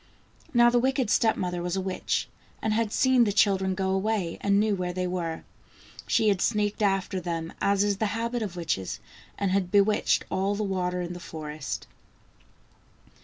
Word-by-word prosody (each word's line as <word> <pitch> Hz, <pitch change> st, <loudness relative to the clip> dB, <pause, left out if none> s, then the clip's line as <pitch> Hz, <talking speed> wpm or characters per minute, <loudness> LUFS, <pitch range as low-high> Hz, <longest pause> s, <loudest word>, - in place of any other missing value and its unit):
Now 240 Hz, -3 st, +5 dB
the 245 Hz, -, +3 dB
wicked 260 Hz, -2 st, +1 dB
step 220 Hz, -1 st, +3 dB
mother 180 Hz, -1 st, -2 dB
was 175 Hz, +1 st, -2 dB
a -, -, 0 dB
witch, 190 Hz, 0 st, -2 dB, 0.3 s
and 220 Hz, -, 0 dB
had 225 Hz, -1 st, 0 dB
seen 260 Hz, +1 st, +4 dB
the 210 Hz, -, +1 dB
children 190 Hz, -2 st, +2 dB
go 190 Hz, 0 st, -1 dB
away, 190 Hz, -3 st, -1 dB
and 200 Hz, 0 st, +3 dB
knew 215 Hz, 0 st, +2 dB
where 180 Hz, -1 st, -3 dB
they 185 Hz, 0 st, -2 dB
were. 175 Hz, -3 st, -3 dB, 0.6 s
She 220 Hz, -2 st, +3 dB
had 195 Hz, -3 st, +1 dB
sneaked 210 Hz, 0 st, 0 dB
after 195 Hz, -2 st, +1 dB
them, 165 Hz, -1 st, -4 dB
as 200 Hz, 0 st, +3 dB
is 205 Hz, -1 st, 0 dB
the 220 Hz, -, 0 dB
habit 235 Hz, +1 st, -2 dB
of 200 Hz, -5 st, -4 dB
witches, 160 Hz, -, -2 dB, 0.4 s
and 200 Hz, -2 st, 0 dB
had 190 Hz, -2 st, +1 dB
bewitched 205 Hz, +2 st, +3 dB
all 195 Hz, +2 st, 0 dB
the 215 Hz, -, -2 dB
water 180 Hz, -2 st, -1 dB
in 175 Hz, 0 st, -5 dB
the 175 Hz, -, -8 dB
forest. 155 Hz, -3 st, -6 dB
195 Hz, 180 wpm, -27 LUFS, 180-215 Hz, 0.6 s, Now